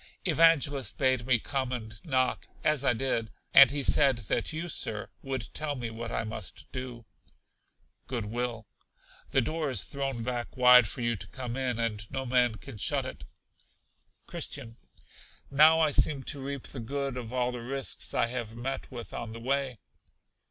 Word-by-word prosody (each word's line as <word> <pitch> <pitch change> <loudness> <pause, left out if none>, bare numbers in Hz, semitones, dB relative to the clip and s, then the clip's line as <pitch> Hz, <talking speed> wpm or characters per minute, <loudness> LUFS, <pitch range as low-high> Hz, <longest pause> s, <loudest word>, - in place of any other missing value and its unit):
Evangelist 145 -5 +3
bade 130 -3 +1
me 125 -2 +5
come 130 +2 -2
and 110 -3 -6
knock 130 -4 0 0.2
(as 150 -3 +2
I 130 - +4
did); 115 -2 -1 0.2
and 140 -2 +10
he 140 +1 -2
said 135 -2 +4
that 110 -4 -1
you, 160 +2 -4
Sir, 105 - -2
would 130 -5 -4
tell 150 -2 -2
me 120 -3 -4
what 115 +1 -6
I - - -1
must 110 -7 -6
do. 125 -2 -6 1.0
Good 120 -4 -3
will. 115 0 -3 0.6
The 135 - +3
door 155 +4 -2
is 125 -8 +1
thrown 135 -4 -3
back 120 +1 -4
wide 125 -2 +8
for 120 - -6
you 120 0 +1
to 100 +1 -7
come 125 0 -6
in, 130 -3 -1
and 110 -2 -2
no 135 0 -3
man 125 -2 +2
can 110 -1 -11
shut - - +1
it. - - -8 1.0
Christian. 115 0 -4 0.7
Now 155 +3 +7
I 155 -2 +3
seem 140 -1 +3
to 140 0 -3
reap 140 -1 -5
the 135 - -6
good 140 +3 -3
of 120 -3 -6
all 125 -1 0
the 125 -1 -6
risks 135 +3 -1
I - - +3
have 115 -2 -4
met 130 +3 -4
with 120 -3 -8
on 110 -1 -5
the 115 - -8
way. 135 0 -1
125 Hz, 175 wpm, -29 LUFS, 115-135 Hz, 1.0 s, and